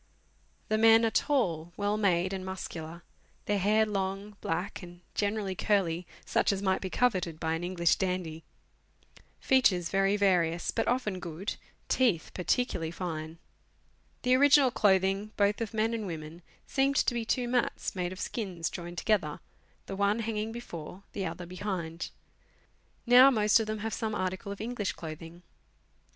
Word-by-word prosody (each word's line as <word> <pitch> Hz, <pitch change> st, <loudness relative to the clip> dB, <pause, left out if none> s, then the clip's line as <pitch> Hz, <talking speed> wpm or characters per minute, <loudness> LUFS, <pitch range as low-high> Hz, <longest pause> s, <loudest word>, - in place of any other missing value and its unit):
The 215 Hz, 0 st, +2 dB
men 225 Hz, +1 st, +7 dB
are 225 Hz, -, +1 dB
tall, 175 Hz, -, 0 dB
well 205 Hz, 0 st, 0 dB
made, 185 Hz, -3 st, +1 dB
and 190 Hz, -1 st, -4 dB
muscular; 170 Hz, -3 st, -6 dB, 0.4 s
their 205 Hz, -1 st, +1 dB
hair 215 Hz, +3 st, +3 dB
long, 200 Hz, 0 st, -3 dB
black, 180 Hz, +5 st, -3 dB
and 175 Hz, -1 st, -12 dB
generally 205 Hz, -1 st, -1 dB
curly 180 Hz, -4 st, 0 dB, 0.2 s
(such -, -, +2 dB
as 195 Hz, -, -1 dB
might 190 Hz, -1 st, +1 dB
be 190 Hz, -, -3 dB
coveted 185 Hz, -9 st, 0 dB
by 160 Hz, -1 st, -1 dB
an 165 Hz, +1 st, -3 dB
English 175 Hz, -1 st, +2 dB
dandy); 180 Hz, -4 st, -2 dB, 1.0 s
features 190 Hz, -10 st, +3 dB
very 195 Hz, +1 st, +2 dB
various, 175 Hz, -4 st, +2 dB
but -, -, -1 dB
often 225 Hz, -7 st, 0 dB
good; 175 Hz, +3 st, -5 dB, 0.3 s
teeth 230 Hz, -11 st, +1 dB
particularly 180 Hz, -3 st, 0 dB
fine. 160 Hz, -2 st, -5 dB, 0.9 s
The 250 Hz, 0 st, +3 dB
original 280 Hz, 0 st, +6 dB
clothing, 195 Hz, -1 st, +2 dB
both 205 Hz, +2 st, +2 dB
of 225 Hz, -, -2 dB
men 220 Hz, +1 st, 0 dB
and 220 Hz, -3 st, -3 dB
women, 160 Hz, 0 st, -7 dB, 0.2 s
seemed 275 Hz, +1 st, +1 dB
to 260 Hz, -, +2 dB
be 235 Hz, -1 st, -1 dB
two 245 Hz, +2 st, 0 dB
mats, 245 Hz, 0 st, -1 dB
made 180 Hz, -1 st, -2 dB
of 185 Hz, -, -8 dB
skins 185 Hz, -7 st, -3 dB
joined 175 Hz, -1 st, -7 dB
together, 170 Hz, -7 st, 0 dB, 0.5 s
the 195 Hz, -, -5 dB
one 200 Hz, +3 st, +1 dB
hanging 220 Hz, 0 st, -2 dB
before, 190 Hz, -5 st, -8 dB
the 195 Hz, -2 st, -2 dB
other 180 Hz, -, -6 dB
behind. 180 Hz, -2 st, -4 dB, 1.0 s
Now 250 Hz, +2 st, +8 dB
most 215 Hz, -4 st, +4 dB
of 220 Hz, -, -2 dB
them 215 Hz, 0 st, -2 dB
have 220 Hz, +1 st, -4 dB
some 220 Hz, -1 st, -2 dB
article 185 Hz, +1 st, -3 dB
of 200 Hz, -, -7 dB
English 220 Hz, -3 st, -2 dB
clothing. 165 Hz, +2 st, -9 dB
195 Hz, 155 wpm, -30 LUFS, 175-220 Hz, 1.0 s, Now